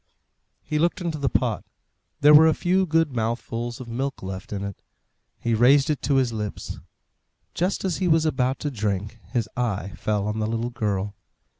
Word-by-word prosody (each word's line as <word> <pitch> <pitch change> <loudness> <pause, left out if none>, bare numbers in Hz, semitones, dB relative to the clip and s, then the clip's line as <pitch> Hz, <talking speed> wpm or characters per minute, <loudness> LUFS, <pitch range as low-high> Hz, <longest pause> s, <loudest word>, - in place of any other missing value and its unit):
He 150 - -1
looked 170 +2 +1
into 170 -4 -3
the 140 -2 +1
pot. 120 -5 0 0.6
There 150 +1 +8
were 155 +2 +9
a 160 - +3
few 185 +1 +1
good 165 -2 +2
mouthfuls 120 +1 -3
of 130 - -8
milk 130 +2 -3
left 95 +4 -6
in 100 -1 -3
it; 100 -1 -6 0.6
he 115 - -1
raised 135 +6 +5
it 150 - -2
to 140 - +1
his 130 -3 +2
lips. 105 -2 -5 0.7
Just 185 +3 -1
as 185 -3 0
he 185 - 0
was 160 -1 +4
about 130 -4 +1
to 145 - -2
drink, 105 -1 -2
his 115 -3 0
eye 105 -5 -2
fell 105 -1 -1
on 105 +1 -2
the 110 - 0
little 115 +2 -2
girl. 100 -3 -2
120 Hz, 185 wpm, -24 LUFS, 105-150 Hz, 0.7 s, were